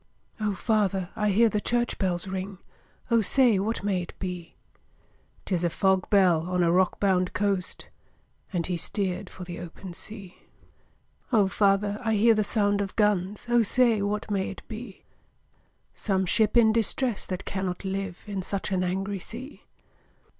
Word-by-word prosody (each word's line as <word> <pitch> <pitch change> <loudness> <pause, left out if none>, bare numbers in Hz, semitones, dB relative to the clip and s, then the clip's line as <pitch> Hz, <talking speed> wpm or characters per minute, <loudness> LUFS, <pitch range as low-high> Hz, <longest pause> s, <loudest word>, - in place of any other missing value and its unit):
'O 210 -2 -1
father! 195 -4 0
I 210 -2 +1
hear 225 +4 +5
the 210 -1 -1
church 240 +1 -1
bells 180 -2 -1
ring, 190 +1 -5 0.5
O 230 -1 +5
say, 235 -1 +5
what 215 +1 -2
may 195 -3 0
it 175 - -9
be?' 180 -3 -6 0.9
''Tis 180 -3 -1
a 175 - +2
fog 190 +1 +1
bell, 180 -5 +3
on 180 -1 +1
a 170 - +3
rock 185 +1 +2
bound 185 -2 +1
coast!' 195 -2 -1 0.6
And 175 -4 -1
he 180 -1 -2
steer'd 185 +2 -2
for 185 - -9
the 175 -1 -7
open 175 +1 -9
sea. 195 -1 -11 0.9
'O 210 -5 +4
father! 200 +1 +1
I 220 -1 +1
hear 225 +3 +5
the 215 -1 +1
sound 205 -1 +1
of 195 -1 -4
guns, 210 -2 +1
O 240 0 +4
say, 230 -1 +3
what 210 +1 -2
may 195 -2 0
it 195 - -9
be?' 220 -3 -9 0.9
'Some 190 -2 0
ship 215 +5 +2
in 220 -2 +6
distress 230 +1 +1
that 185 -1 -4
cannot 190 0 -3
live 195 -1 -4
In 200 -3 -4
such 195 +1 -3
an 185 -1 +1
angry 195 +2 -2
sea!' 250 +9 -8
195 Hz, 165 wpm, -26 LUFS, 185-215 Hz, 0.9 s, in